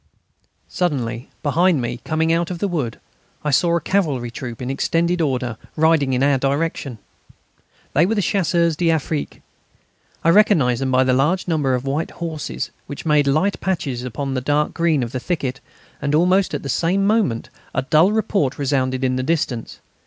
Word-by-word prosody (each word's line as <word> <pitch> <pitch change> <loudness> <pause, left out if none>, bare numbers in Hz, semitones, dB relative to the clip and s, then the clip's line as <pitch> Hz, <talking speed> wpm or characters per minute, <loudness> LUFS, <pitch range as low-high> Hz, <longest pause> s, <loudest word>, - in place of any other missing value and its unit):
Suddenly, 125 -8 -2
behind 165 +2 +3
me, 120 0 -3
coming 160 +1 +1
out 170 0 0
of 180 - -4
the 200 - -1
wood, 150 - -3 0.4
I 150 - 0
saw 170 +5 +3
a - - +2
cavalry 145 -10 0
troop 120 -1 -7
in 125 +1 -3
extended 170 +5 0
order, 125 -6 -1 0.2
riding 155 -4 +3
in 125 +1 +1
our 140 -1 +3
direction. 140 -2 -1 1.0
They 165 +5 +4
were 225 - 0
Chasseurs 175 -5 +1
d'Afrique. 160 -2 -1 0.8
I 165 - +4
recognised 165 - +4
them 135 - 0
by 130 0 +4
the 130 0 +2
large 150 +9 +1
numbers 145 -6 +1
of 125 - -7
white 145 +4 -1
horses, 160 -3 -4 0.2
which 140 - -7
made 150 -2 +3
light 155 +9 +1
patches 140 -10 -2
upon 135 +2 -4
the 130 - -1
dark 145 +3 0
green 165 -5 +1
of 115 - -5
the 130 - -3
thicket, 135 -4 -3 0.4
and 145 +1 0
almost 185 +4 +3
at - - -5
the - - -5
same 175 +8 +1
moment 205 - +1 0.2
a - - +1
dull 155 +8 +4
report 205 -10 0
resounded 130 -2 0
in 130 -1 +1
the - - 0
distance. 130 -5 -2
150 Hz, 175 wpm, -21 LUFS, 130-170 Hz, 1.0 s, They